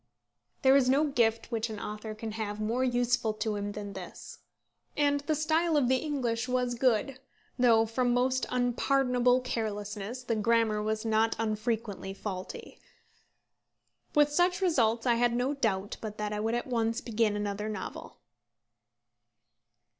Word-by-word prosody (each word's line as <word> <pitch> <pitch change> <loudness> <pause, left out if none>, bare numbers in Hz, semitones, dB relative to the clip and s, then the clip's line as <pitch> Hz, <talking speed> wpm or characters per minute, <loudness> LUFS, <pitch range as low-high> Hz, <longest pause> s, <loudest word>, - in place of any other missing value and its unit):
There 265 0 +6
is 265 -2 +4
no 275 +3 +4
gift 230 -5 +1
which 230 0 -1
an 215 -2 -6
author 215 +1 -6
can 220 0 -5
have 215 -1 -4
more 230 +4 0
useful 245 -3 +1
to 215 0 -2
him 205 0 -3
than 205 -1 -6
this. 185 -2 -9 0.6
And 285 -1 +3
the 305 +2 -1
style 315 +1 +2
of 255 -4 +2
the 260 - +4
English 250 -5 -2
was 250 -1 0
good, 250 +1 +1 0.4
though 230 -2 +5
from 245 +2 0
most 255 +1 +1
unpardonable 250 0 +2
carelessness 215 0 -4
the 235 -2 -1
grammar 220 -1 +2
was 215 +1 -2
not 225 0 +2
unfrequently 215 -3 -2
faulty. 190 -2 -7 1.4
With 295 0 +5
such 355 +4 +2
results 240 - +2
I 245 - +4
had 240 -1 +3
no 250 +4 0
doubt 205 -7 -1
but 215 -1 -6
that 210 0 -3
I 210 - -2
would 225 +2 0
at 240 - -2
once 230 -1 0
begin 225 -5 0
another 205 +1 -3
novel. 210 -3 -7
230 Hz, 150 wpm, -29 LUFS, 215-255 Hz, 1.4 s, There